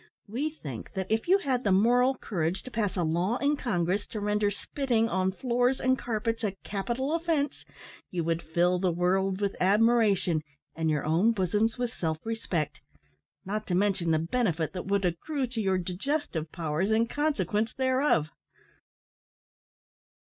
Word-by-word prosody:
We 255 +9 -1
think 145 - -8
that 190 +1 -3
if 220 +6 +1
you 380 +2 +6
had 265 -9 -1
the 200 - +2
moral 245 +7 +4
courage 175 -3 -2
to 255 - -9
pass 210 -4 -1
a 175 - +1
law 175 +8 +1
in 285 +2 +2
Congress 200 -6 -1
to 215 - -5
render 210 0 +1
spitting 230 +2 0
on 190 -4 +1
floors 245 +4 +1
and 260 0 +3
carpets 225 -2 -2
a 205 -3 0
capital 240 +8 -2
offence, 330 -4 0 0.5
you 175 -2 -2
would 165 0 0
fill 175 +2 +1
the 185 0 +2
world 185 +2 +1
with 200 -1 -1
admiration 205 -4 +3 0.3
and 160 0 0
your 150 -2 0
own 175 +9 +3
bosoms 210 +3 +1
with 245 -1 -2
self 160 -2 -2
respect, 220 -9 -2 0.6
not 210 +3 -3
to 180 - 0
mention 190 -3 +1
the 160 - +4
benefit 170 -1 0
that 180 -1 -5
would 200 -1 +1
accrue 260 - -1
to 240 -2 -3
your 190 -2 +2
digestive 185 - -2
powers 165 +3 -1
in 220 +1 +3
consequence 235 -6 0
thereof! 260 - +2
205 Hz, 160 wpm, -28 LUFS, 180-245 Hz, 0.6 s, you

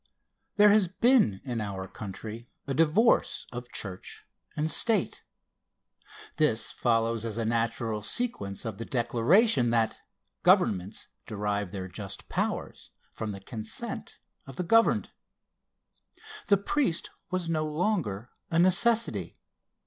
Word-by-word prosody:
There 210 0 +7
has 205 -3 +4
been 210 - +3
in 120 -4 -3
our 95 -2 -5
country 110 +4 -8 0.2
a 140 - -2
divorce 165 - +3
of 120 0 -7
church 95 -3 -5 0.3
and 155 +1 -1
state. 220 -5 +1 1.2
This 150 -7 +2
follows 115 -1 +1
as 115 -1 -3
a 115 - -1
natural 115 -1 -1
sequence 105 - -2
of 110 -2 -5
the - - -3
declaration 125 - +3
that 115 -1 +1 0.4
"governments 95 +4 +2 0.2
derive 105 -3 -2
their 95 -2 -5
just 100 +2 -7
powers - - -3 0.2
from 110 -1 -5
the 95 -1 -8
consent 110 +2 -6 0.3
of 135 - -9
the 180 - -2
governed." 225 +6 +3 1.4
The 200 - +5
priest 200 - 0 0.2
was 185 -2 -2
no 160 -2 0
longer 150 - -1 0.2
a 165 - 0
necessity. 205 +7 +3
120 Hz, 120 wpm, -28 LUFS, 105-180 Hz, 1.4 s, There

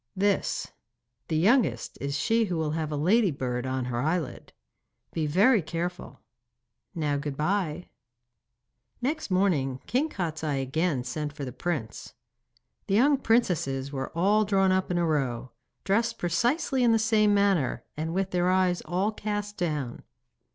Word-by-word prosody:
'This. 200 0 0 0.6
The 160 - 0
youngest 190 - +2
is 140 +1 -2
she 225 +9 +2
who 180 -4 -2
will 155 -2 -1
have 155 -1 -2
a - - -1
ladybird 145 - +1
on 130 -1 -2
her 120 -1 -2
eyelid. 155 -3 -2 0.6
Be 160 -2 -1
very 205 - +4
careful. 170 -2 -5 0.7
Now 150 -3 0
good 140 -1 -4
bye.' 175 0 -1 1.1
Next 295 +3 -2
morning 165 -9 +1
King 280 +6 0
Kostiei 155 - -2
again 145 0 0
sent 150 +4 -4
for 145 -2 -6
the 125 - -5
prince. 145 -5 -4 0.7
The 195 - +1
young 280 +7 +5
princesses 160 - +1
were 135 -2 -4
all 205 +5 +4
drawn 195 -2 +2
up 185 0 +1
in 180 - 0
a 175 - +2
row, 130 -6 -1 0.3
dressed 225 +4 +1
precisely 250 - 0
in 235 -1 +5
the - - +5
same 215 -1 +3
manner, 195 -10 +1
and 160 +2 -3
with 190 +2 -1
their 180 0 +1
eyes 185 -1 +2
all 190 +5 0
cast 205 -1 -4
down. 150 -9 -3
175 Hz, 150 wpm, -27 LUFS, 145-205 Hz, 1.1 s, young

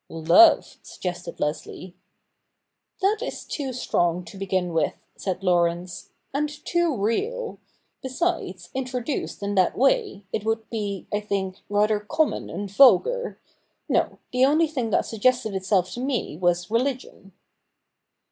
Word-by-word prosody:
' - - -53
Love,' 170 - +5
suggested 175 -1 -6
Leslie. 175 +4 -4 1.1
'That 410 +3 +3
is - - -5
too 275 -3 -4
strong 175 -8 0
to - - -11
begin 190 -2 -1
with,' 160 -2 +1 0.2
said 190 -1 -4
Laurence, 175 -1 0
' - - -46
and 295 +2 0 0.2
too 345 -6 +1
real. 435 - -2 0.4
Besides, 260 - -2
introduced 255 -3 -3
in 200 0 -1
that 185 -3 +2
way, 230 -6 +1
it 210 - -1
would 225 0 -1
be, 205 -4 -3
I 205 - +2
think, 195 -2 -3
rather 210 +1 +2
common 305 +9 -1
and 200 +5 -4
vulgar. 275 - +4 0.5
No - - +1
— - - -48
the 250 +1 +3
only 305 +5 +5
thing 265 -7 -2
that - - +2
suggested 230 0 +1
itself 190 -1 +1
to - - -6
me 255 - -2
was 175 +2 0
religion.' 240 -5 -2
210 Hz, 140 wpm, -24 LUFS, 185-265 Hz, 1.1 s, Love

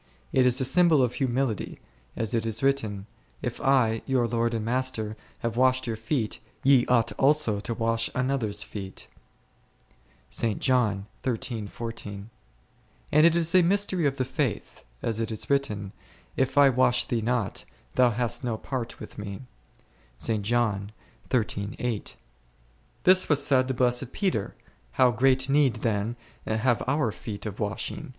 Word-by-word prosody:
It 130 -1 +4
is 125 0 +2
a 130 - +1
symbol 155 +1 +4
of 125 -1 0
humility, 130 -4 -1 0.4
as 110 -2 -2
it 115 - +1
is 115 +2 -2
written, 110 -8 0 0.4
If - - -4
I, 125 -5 +3
your 130 -3 +2
Lord 115 0 0
and 110 -1 -3
Master, 115 -3 -1 0.3
have 115 -1 -2
washed 130 0 +3
your 115 -2 -2
feet, 110 0 -2 0.2
ye 135 -2 +5
ought 120 -3 +3
also 140 -7 +3
to 115 +3 -4
wash 115 0 +1
one 125 - +1
another's 125 -6 -1
feet 95 -2 -8 1.2
f; - - -1
and 110 -3 +1 2.0
it 160 +3 +5
is 170 0 +1
a 185 - +7
mystery 185 -2 +2
of 140 0 -2
the 130 - 0
faith, 130 -3 -3 0.2
as 115 -1 -1
it 115 0 -2
is 110 +5 -4
written, 105 -9 0 0.4
If 130 +1 0
I 140 -1 +8
wash 120 -1 +3
thee 120 -2 -1
not, 115 -2 -1 0.3
thou 125 -1 +4
hast 120 +3 -2
no 120 -3 -1
part 125 -1 -5
with - - -10
Me%. 100 +3 -6 0.8
This - - -4 3.0
was 145 -2 +3
said 130 -2 +3
to 130 - -1
blessed 125 +1 +1
Peter, 185 - -1 0.4
how 125 - +4
great 130 +3 +3
need 140 -3 +3
then 110 0 -1 0.3
have 115 +2 +1
our 140 -4 +1
feet 105 0 -7
of 105 -2 -6
washing 105 -2 -3
125 Hz, 145 wpm, -26 LUFS, 110-135 Hz, 3.0 s, I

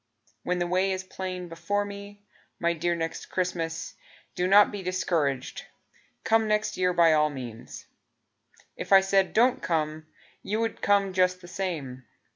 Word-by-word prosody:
When 180 +6 -1
the 175 - 0
way 185 +2 +1
is 190 0 -4
plain 185 -1 -6
before 170 +5 -2
me. 205 0 -10 0.4
My 170 0 +1
dear 170 +1 -1
Next 165 -1 -4
Christmas, 165 -3 -3 0.4
Do 180 - 0
not 200 +2 +6
be 205 - -5
discouraged, 165 -7 -1 0.6
Come 225 0 +3
next 210 0 0
year 180 0 +1
by 170 -2 +5
all 150 0 +3
means; 125 -5 -8 0.9
If - - -7
I 195 -1 +9
said 195 -1 +2
"Don't 250 +3 +3
come" 155 -1 -2 0.3
You 215 +2 -2
would 225 -1 -2
come 200 -1 +2
just 185 0 +2
the 175 - -12
same. 155 -10 -5
180 Hz, 155 wpm, -27 LUFS, 165-200 Hz, 0.9 s, I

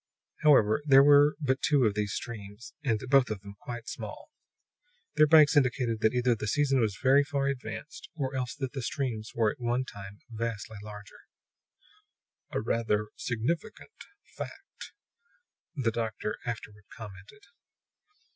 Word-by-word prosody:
However, 135 -6 +5
there 135 -2 +7
were 145 +1 +6
but 135 -3 0
two 145 -3 +3
of 105 - +2
these 105 -1 -2
streams, 105 -1 -7
and 115 -6 +1
both 135 -2 +4
of 105 -3 -4
them 100 0 -10
quite 120 0 -7
small. 110 - -8 0.8
Their 155 - +5
banks 155 -1 +6
indicated 125 -4 +2
that 110 +2 +2
either 125 0 +3
the 105 -2 -4
season 135 +3 +2
was 110 -4 0
very 135 +2 +5
far 140 -1 -2
advanced, 140 +3 -5
or 135 -4 -3
else 125 -2 -3
that 135 -3 -4
the 135 - -4
streams 115 -4 -3
were 110 -2 +2
at - - -12
one 120 +2 0
time 100 -2 -10
vastly 110 -2 -5
larger. 105 -1 -11 1.3
"A - - -2
rather 105 -2 0
significant 125 - -3 0.4
fact," 390 - -9 0.8
the 125 -6 0
doctor 110 -1 -3
afterward 105 -3 -6
commented. 105 - -11
120 Hz, 145 wpm, -29 LUFS, 110-140 Hz, 1.3 s, there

